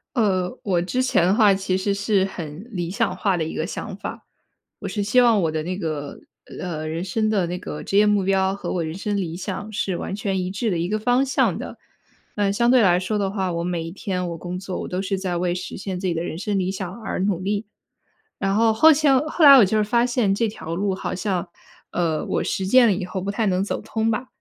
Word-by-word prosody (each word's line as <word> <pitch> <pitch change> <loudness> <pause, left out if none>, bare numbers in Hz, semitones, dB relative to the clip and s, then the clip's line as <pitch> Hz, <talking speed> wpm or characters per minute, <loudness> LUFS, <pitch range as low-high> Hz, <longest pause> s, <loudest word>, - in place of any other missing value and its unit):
呃， 190 -6 +1
我 180 -4 +1
之 250 +9 -1
前 220 -9 +2
的 190 - +3
话， 210 -3 +5
其 190 -1 -1
实 200 +1 0
是 200 -1 +1
很 170 -1 -7
理 175 -5 -3
想 225 +4 -1
化 195 -3 0
的 160 - -1
一 160 - -4
个 - - -2
想 - - -6
法。 - - -7 0.5
我 - - -5
是 205 - -2
希 215 +5 +4
望 230 -4 +4
我 160 - +1
的 155 - -2
那 180 +3 -3
个， 155 -6 -4 0.4
呃， 155 -3 -4
人 165 +2 -3
生 215 +4 0
的 200 -4 +1
那 180 +1 -4
个 150 -4 -7
职 - - -4
业 210 - +6
目 205 -2 +3
标 190 0 +1
和 200 - -5
我 175 -2 -1
人 160 - -4
生 205 +2 -2
理 175 -4 -2
想 200 +3 -5
是 195 -4 -2
完 195 - -4
全 200 -3 -2
一 180 - -3
致 200 +4 -2
的 175 - 0
一 170 +2 -1
个 215 - 0
方 245 +4 +2
向 265 - +1
的。 - - -7 0.6
嗯 200 -2 +1
相 235 +3 +3
对 255 -1 +6
来 180 -4 +4
说 205 +3 -2
的 195 - 0
话， 190 -2 -2
我 170 0 -2
每 175 -2 -2
一 165 - -6
天 180 -1 -3
我 170 - -5
工 175 +2 -5
作 185 -1 -5
我 - - -5
都 180 +1 -2
是 195 0 -2
在 185 -2 -2
为 175 0 0
实 180 +1 -6
现 190 -2 -4
自 190 - -2
己 175 - +1
的 165 0 -2
人 165 - -5
生 205 +2 -1
理 185 0 0
想 190 +1 -6
而 220 - -3
努 190 -2 0
力。 205 +3 -2 0.7
然 195 0 0
后， 225 +1 +4
后来 290 +2 +5
后 320 +1 0
来 280 -1 +11
我 235 - +7
就 215 +3 0
是 215 - +3
发 235 +3 +2
现 240 -5 +1
这 225 +3 +1
条 165 -6 -6
路 195 +1 0
好 - - -4
像， 185 -1 -2 0.4
呃， 165 -3 -1
我 - - -1
实 190 - -2
践 245 +5 +6
了 210 - +4
以 185 0 -3
后 185 +1 -4
不 195 - -4
太 220 +2 -1
能 185 0 +1
走 205 - -3
通 220 0 -1
吧。 235 +3 -2
195 Hz, 280 characters per minute, -23 LUFS, 180-215 Hz, 0.7 s, 来